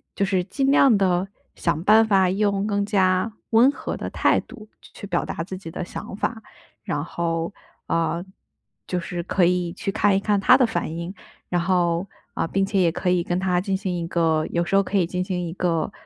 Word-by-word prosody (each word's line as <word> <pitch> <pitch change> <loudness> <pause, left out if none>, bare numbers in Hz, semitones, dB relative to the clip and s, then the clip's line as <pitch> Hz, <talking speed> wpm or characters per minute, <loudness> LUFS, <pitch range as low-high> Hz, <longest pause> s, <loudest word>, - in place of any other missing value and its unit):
就 195 - +1
是 190 -2 0
尽 270 +8 0
量 270 -5 +6
地 185 -1 +1 0.3
想 165 -1 -1
办 220 +2 +6
法 190 -3 +4
用 200 +1 0
更 205 -1 0
加 190 0 +2 0.2
温 235 +5 +6
和 - - -5
的 - - -5
态 - - +2
度， 215 - -13
去 - - -17
去 200 - -9
表 175 -3 0
达 165 - -4
自 185 +2 -7
己 185 -3 -9
的 180 - -4
想 190 - -7
法。 220 +1 -2 0.4
然 - - -2
后， 165 +1 -2 0.3
呃， 165 +1 0 0.6
就 180 - -1
是 175 0 -4
可 185 0 +2
以 175 -1 0
去 195 +1 -3
看 205 -1 +2
一 - - +3
看 205 0 +1
他 250 +6 +6
的 260 - +4
反 175 -9 -2
应， 170 +2 -5 0.4
然 175 -1 +1
后 175 0 +1 0.3
呃， - - -1
并 195 +2 0
且 195 0 0
也 175 -2 +4
可 180 +2 -2
以 180 -1 +2
跟 175 +1 -1
他 185 -1 +1
进 195 +1 -1
行 190 -1 -3
一 170 - -3
个 160 -2 +1
有 170 - +1
时 185 - -6
候 195 - +6
可 200 +1 -4
以 180 - +3
进 180 +1 -3
行 180 -1 -2
一 - - -5
个， 175 -1 -1
185 Hz, 235 characters per minute, -23 LUFS, 175-200 Hz, 0.6 s, 量